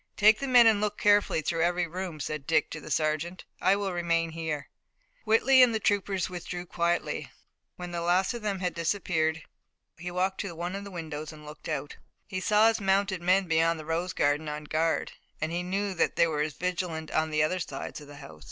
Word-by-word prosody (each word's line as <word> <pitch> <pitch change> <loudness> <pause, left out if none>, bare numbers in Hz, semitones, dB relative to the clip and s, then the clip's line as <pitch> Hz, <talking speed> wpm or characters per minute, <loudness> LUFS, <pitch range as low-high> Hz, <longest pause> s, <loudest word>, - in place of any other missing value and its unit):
"Take 215 +1 +6
the 275 - -3
men 245 -2 +7
and 220 -2 +4
look 210 -1 -1
carefully 205 -6 +3
through 165 +2 -1
every 175 +1 +2
room," 175 -1 -5
said 145 0 -4
Dick 160 -2 +2
to 155 - -6
the - - -10
sergeant. 155 +4 -1 0.2
"I 190 - +4
will 200 -2 -2
remain 170 -1 0
here." 160 -3 -4 0.6
Whitley 255 +4 +5
and 240 -3 +5
the - - 0
troopers 200 -2 0
withdrew 180 0 -6
quietly. 170 0 -1 0.5
When 180 -1 -7
the 170 -1 -3
last 180 +4 +2
of 235 - -6
them 200 -3 -2
had 180 -1 -1
disappeared 165 -2 0 0.6
he 180 +2 -5
walked 185 +2 -1
to 185 -4 -6
one 175 +3 -4
of 200 0 -6
the - - -7
windows 155 -4 -6
and 150 -1 -13
looked 150 +1 -9
out. 150 -2 -4 0.3
He 185 - -4
saw 210 +3 +4
his 225 -1 -1
mounted 195 -1 +1
men 185 +2 +3
beyond 165 0 +2
the 155 - -8
rose 170 +3 -2
garden 145 +2 +1
on 150 0 -5
guard, 155 0 0 0.3
and 160 +1 -2
he 175 +1 -1
knew 195 +2 -2
that 175 - 0
they - - +5
were 155 -3 -1
as 150 0 -1
vigilant 170 -2 -3
on 160 0 +1
the 155 -1 +2
other 185 +4 0
sides 140 -2 -6
of 145 - -12
the 145 - -11
house. 140 - -12
175 Hz, 215 wpm, -28 LUFS, 160-195 Hz, 0.6 s, men